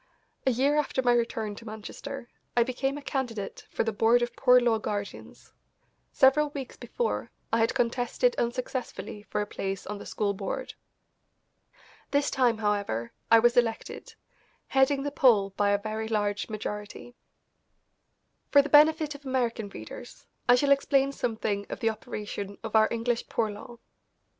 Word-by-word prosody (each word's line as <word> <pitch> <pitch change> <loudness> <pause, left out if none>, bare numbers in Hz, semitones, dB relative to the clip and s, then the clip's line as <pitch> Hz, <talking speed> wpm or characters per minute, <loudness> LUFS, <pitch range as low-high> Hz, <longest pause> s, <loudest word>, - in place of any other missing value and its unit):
A - - +5
year 275 +5 +2
after 275 -3 0
my 245 -1 +4
return 230 -3 -1
to 230 - -11
Manchester 240 +5 -7 0.3
I 240 - +6
became 270 +3 -2
a 290 - -9
candidate 240 -8 -4
for - - -1
the 225 - -1
Board 230 +3 +4
of 240 0 -4
Poor 250 -1 +6
Law 235 -2 +2
Guardians. 205 -1 -6 0.6
Several 285 +3 +4
weeks 280 -3 -7
before, 480 - -3 0.2
I 230 - +4
had 225 - +2
contested 245 - +1
unsuccessfully 240 -2 -3
for - - -1
a - - -1
place 195 -2 -4
on 205 0 -5
the - - -9
school 205 -2 -1
board. 195 0 -4 1.4
This 285 0 +1
time, 245 -4 +2
however, 200 - -1 0.2
I 230 - +8
was 240 +1 +4
elected, 230 -2 -1 0.5
heading 270 +1 +3
the 285 - -2
poll 220 -9 +4
by 200 +1 +1
a 200 - +3
very 215 +1 -4
large 205 -4 -1
majority. 210 +2 -6 1.4
For 285 -1 +6
the 290 - -5
benefit 305 +1 +5
of 285 0 -12
American 240 -5 -1
readers - - -10 0.2
I 245 - +9
shall 280 +3 +2
explain 275 0 +3
something 220 -6 -2
of - - -5
the 225 -3 +2
operation 205 -2 -6
of 225 0 -4
our 220 0 +6
English 235 0 -2
Poor 220 -2 0
Law. 235 +4 -10
235 Hz, 155 wpm, -28 LUFS, 210-265 Hz, 1.4 s, I